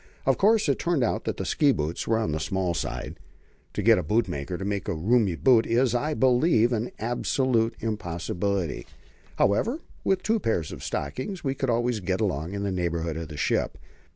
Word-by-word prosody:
Of - - +2
course 210 0 +4
it 140 - +1
turned 170 -6 +1
out 115 - -1
that - - -2
the - - -3
ski 145 -2 +3
boots 80 - -2
were 115 - +2
on 110 -6 -1
the 75 - -1
small 90 +2 -1
side. 85 - -4 0.5
To - - -2
get - - +6
a - - -2
bootmaker 85 -4 -1
to 95 - -5
make 100 -2 -2
roomy 100 +3 +2
boots 115 - +4
is, 120 +2 +3
I 150 +5 0
believe, 125 -2 +3
an 115 +1 -1
absolute 120 0 0
impossibility. 95 -3 -2 0.5
However, 220 - +2 0.3
with 190 -1 +1
two 225 +1 +2
pairs 100 - -1
of - - -8
stockings 130 - -4
we 135 -2 0
could 135 -1 -2
always 120 -1 +1
get 95 0 -1
along 90 -5 -1
in 100 - -3
the 100 - -1
neighbourhood 85 -3 -2
of 80 0 -5
the 75 -1 -9
ship. - - 0
110 Hz, 190 wpm, -26 LUFS, 85-130 Hz, 0.5 s, get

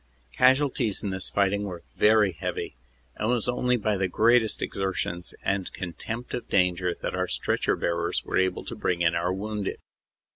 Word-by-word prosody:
Casualties 130 -4 +3
in 100 - -1
this 95 0 0
fighting 100 +1 +1
were 90 -3 -7
very 105 -2 +5
heavy, 80 - -4 0.4
and 110 - -1
it - - +3
was 115 - 0
only 125 0 +1
by 105 -2 0
the 95 0 +1
greatest 110 +4 +3
exertions 95 -2 -3
and 95 -1 -1
contempt 110 +7 -5
of 120 - -4
danger 90 -1 +2
that - - -2
our - - -1
stretcher - - 0
bearers 85 +1 -1
were - - +1
able 95 -1 0
to - - -6
bring 85 -1 0
in 85 0 +3
our 85 +1 0
wounded. 105 +1 -3
100 Hz, 175 wpm, -26 LUFS, 90-110 Hz, 0.4 s, very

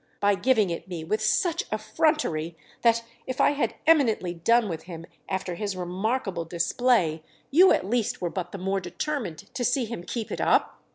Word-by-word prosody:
—by 205 0 +3
giving 215 -3 +2
it 170 - -5
me 175 -3 -5
with 215 +7 -1
such 335 - +1
effrontery 215 - 0 0.2
that, 230 -1 +3 0.2
if 255 0 -4
I - - +5
had 290 0 -1
eminently 245 - +3
done 230 +7 +3
with 165 -4 -5
him 165 -2 -8 0.2
after 190 -1 -2
his 195 +1 -4
remarkable 190 +1 -2
display, 170 0 +1 0.3
you 360 +7 +7
at - - +2
least 230 0 0
were 175 -2 -2
but 180 -2 -4
the - - -6
more 195 +1 -1
determined 185 - -5
to 260 -1 -2
see 245 +1 +1
him 225 -5 -6
keep 225 +3 -5
it - - -3
up?" - - +2
205 Hz, 180 wpm, -26 LUFS, 175-245 Hz, 0.3 s, you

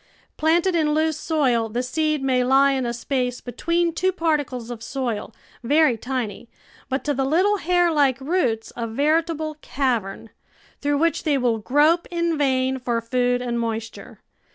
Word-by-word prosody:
Planted 340 +4 +2
in 305 -2 +2
loose 315 -1 0
soil, 250 -8 +1
the 240 +3 -2
seed 305 +2 -1
may 255 -2 +2
lie 270 +2 +4
in 260 -2 -1
a - - -1
space 250 +1 -2
between 335 +7 -1
two 375 +3 +1
particles 290 -9 -2
of 235 -2 -7
soil, 235 -3 -3 0.3
very 290 +1 +3
tiny, 235 -2 -4 0.4
but 265 +1 -2
to 295 - 0
the 270 0 -1
little 365 +9 +2
hair 355 -1 +2
like 280 -4 +2
roots 265 -7 -1
a 230 -1 -3
veritable 310 +5 0
cavern, 230 -6 -2 0.5
through 290 0 +1
which 330 +2 +1
they 295 -3 +2
will 240 -3 +1
grope 300 +9 +2
in 340 -1 0
vain 265 -2 +1
for 240 -2 -1
food 245 +1 0
and 240 -1 -2
moist 225 -1 -3
ure. - - -13
270 Hz, 165 wpm, -23 LUFS, 245-315 Hz, 0.5 s, lie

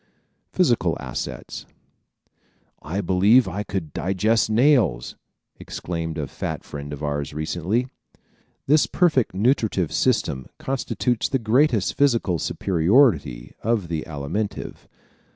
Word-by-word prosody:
Physical - - +2
Assets - - -6
¶ - - -33 1.1
"I 90 +6 -3
believe 100 +6 +4
I 95 +3 -3
could 95 -7 -5
digest 105 +6 +1
nails!" 120 - +2 0.4
exclaimed 85 -2 -5
a 75 - -2
fat - - -5
friend 70 0 -8
of 75 +1 -7
ours 75 0 -3
recently. 90 +10 -1 0.8
This 150 +2 +4
perfect 155 - +2
nutritive 105 - +1
system 65 -1 0
constitutes 125 -2 -1
the 135 - +1
greatest 115 -2 +2
physical 115 - +2
superiority 90 - +2
of 110 -6 0
the 80 -2 -2
Alimentive. 80 +8 -4
95 Hz, 110 wpm, -23 LUFS, 80-120 Hz, 1.1 s, believe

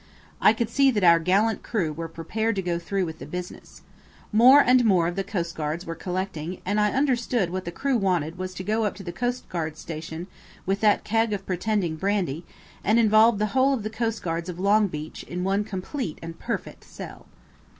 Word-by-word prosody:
I 210 - +6
could 225 0 -2
see 275 -1 +4
that 210 -6 0
our 170 -1 +7
gallant 200 +7 +2
crew 180 -10 -1
were 165 +2 -5
prepared 215 +8 -2
to 190 - -2
go 175 -1 -1
through 190 +2 -1
with 160 -1 -7
the - - -7
business. 180 0 -8 0.5
More 250 +6 +8
and 250 -2 +5
more 185 -7 +4
of 175 - -3
the 195 - -1
coastguards 170 -4 -3
were 165 - -4
collecting, 180 -1 -4
and 205 +3 +1
I 210 - +3
understood 245 -7 +1
that - - -9
what 185 0 -4
the 170 - -4
crew 270 +8 0
wanted 175 -6 0
was 185 0 -5
to 185 - -5
go 215 +3 0
up 205 - -2
to 200 - -9
the 175 -1 -6
coastguard 180 -11 -3
station 160 +1 -6 0.4
with 195 +1 0
that 210 -2 +3
keg 225 0 +1
of 195 -1 -4
pretending 185 -3 -1
brandy, 180 -4 -1 0.4
and 215 +3 +3
involve 220 0 +5
the 210 - +1
whole 265 +1 +4
of 230 - -5
the 215 - -4
coastguards 200 -7 -2
of 175 - -6
Longbeach 195 -6 0
in 180 +1 -4
one 195 +2 +1
complete 195 - -5
and 165 0 -8
perfect - - -5
sell. - - -10
195 Hz, 200 wpm, -25 LUFS, 170-220 Hz, 0.5 s, More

